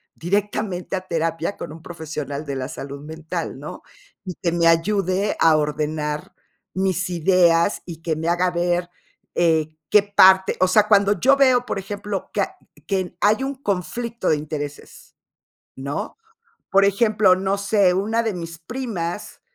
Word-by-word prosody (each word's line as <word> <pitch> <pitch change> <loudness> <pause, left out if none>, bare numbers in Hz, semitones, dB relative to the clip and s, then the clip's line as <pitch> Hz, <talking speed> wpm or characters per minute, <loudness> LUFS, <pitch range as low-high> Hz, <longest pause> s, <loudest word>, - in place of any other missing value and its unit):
directamente 195 0 -2
a 185 - -2
terapia 165 +2 -1
con - - -7
un 160 +1 -11
profesional 155 -4 -6
de 140 -2 -4
la 130 -1 -3
salud 140 0 -8
mental, 155 +1 -5
¿no? - - -9 0.4
Y 185 - -4
que 170 - +1
me 170 0 +2
ayude 185 +3 +1
a 160 -1 +5
ordenar 150 0 -2 0.4
mis 190 -1 0
ideas 175 0 +3
y 165 -2 -9
que 165 -1 -1
me 160 +2 -4
haga 175 +1 +2
ver, 175 0 0 0.5
eh, 160 -2 +2
qué 210 -1 +6
parte, 190 -2 +5
o 185 - +4
sea, 210 +3 +4
cuando 200 -2 +4
yo 270 +6 +5
veo, 255 -3 +4
por - - -3
ejemplo, 200 0 -5
que - - +1
a - - -3 0.3
que 195 -2 +1
n 185 -1 -6
hay 215 +5 +3
un 275 +1 -3
conflicto 235 +1 -3
de - - +4
intereses, 145 -1 -7 0.6
¿no? 140 +2 -5 0.5
Por 195 +1 +4
ejemplo, 205 -1 +4
no 190 +1 -1
sé, 200 -2 +3
una 215 +5 0
de 220 -2 -1
mis 165 -2 -7
primas, 205 -2 -5
180 Hz, 160 wpm, -22 LUFS, 160-200 Hz, 0.6 s, qué